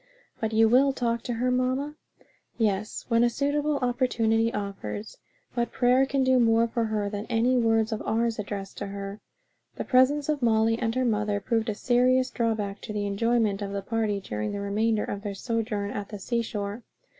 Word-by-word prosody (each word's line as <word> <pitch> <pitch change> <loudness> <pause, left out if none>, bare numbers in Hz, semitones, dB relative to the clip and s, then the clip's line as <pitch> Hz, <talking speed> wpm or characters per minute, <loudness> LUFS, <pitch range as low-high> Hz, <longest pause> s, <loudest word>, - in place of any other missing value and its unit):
"But 220 -1 -1
you 225 0 +5
will 265 +4 +4
talk 235 -3 -1
to 245 - -2
her, 250 +2 0
mamma?" 255 +3 0 0.6
"Yes, 210 -2 -1
when 230 0 +4
a 240 - +4
suitable 290 +3 0
opportunity 230 -3 +1
offers; 200 - -5 0.3
but 240 -1 -1
prayer 255 +2 +3
can 270 0 +1
do 260 -1 +4
more 230 0 +4
for 230 0 -1
her 215 -2 -1
than 205 +1 -5
any 240 +2 +2
words 225 -2 +2
of 220 - -2
ours, 230 0 0
addressed 200 -1 -5
to 200 - -4
her." 200 +1 -6 0.5
The - - -4
presence 275 +3 +3
of 300 -2 0
Molly 225 -1 +3
and 225 -1 -1
her 255 0 +1
mother 210 -3 0
proved 225 +2 -1
a 210 - -2
serious 255 +2 +2
drawback 215 -4 -1
to 215 - -6
the 205 -1 -2
enjoyment 215 0 +1
of 200 0 -4
our 200 - -2
party 215 -2 -1
during 105 - -4
the 205 - -3
remainder 210 +2 0
of 200 - -4
their 205 -1 -5
sojourn 215 -2 -2
at 205 -1 -5
the 210 - -6
seashore. 215 0 -3
225 Hz, 190 wpm, -27 LUFS, 205-245 Hz, 0.6 s, you